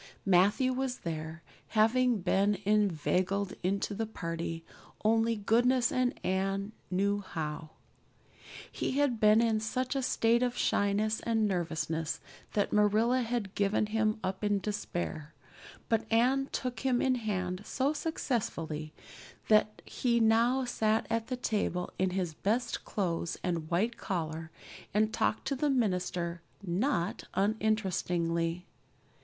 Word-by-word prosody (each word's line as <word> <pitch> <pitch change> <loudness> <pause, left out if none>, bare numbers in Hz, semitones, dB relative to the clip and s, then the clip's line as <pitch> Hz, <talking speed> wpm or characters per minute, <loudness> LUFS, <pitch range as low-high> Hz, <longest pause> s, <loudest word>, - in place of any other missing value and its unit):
Matthew 200 +8 +4
was 260 -1 -2
there, 160 0 -5 0.3
having 235 0 +4
been 195 +3 +2
inveigled 195 -1 +1
into 195 +3 -1
the 225 +2 -2
party 165 -4 -4 0.4
only 225 +1 +3
goodness 240 +4 +3
and 255 0 0
Anne 195 +2 0 0.2
knew 200 +2 +1
how. 155 -4 -5 1.0
He - - -2
had 280 -6 +2
been 215 +1 +6
in 225 -2 +2
such 255 +5 -2
a 270 - +1
state 235 -2 +2
of 245 -1 0
shyness 210 +2 +1
and 225 -2 +1
nervousness 165 -3 -2 0.3
that 205 -1 0
Marilla 215 +5 +3
had 230 -4 -2
given 200 +1 +1
him 215 0 0
up 190 +2 -3
in 205 -1 +2
despair, 175 -6 -4 0.5
but 225 0 0
Anne 260 +4 +3
took 250 -3 -3
him 255 -2 +1
in 260 - +2
hand 190 -6 -2
so 270 +6 0
successfully 165 - -3 0.6
that 215 0 +3
he 235 -2 0
now 235 +4 +3
sat 220 -2 +1
at 230 0 0
the 255 - -3
table 205 -7 -1
in 190 0 +2
his 180 -3 -2
best 230 +9 -1
clothes 170 -4 -2
and 170 -3 -2
white 215 +8 0
collar 160 -4 -3 0.5
and 215 +1 +2
talked 215 - 0
to 275 - 0
the 290 +3 0
minister 180 -8 0 0.2
not 185 +1 -1
uninterestingly. 180 -5 0
210 Hz, 130 wpm, -31 LUFS, 180-235 Hz, 1.0 s, been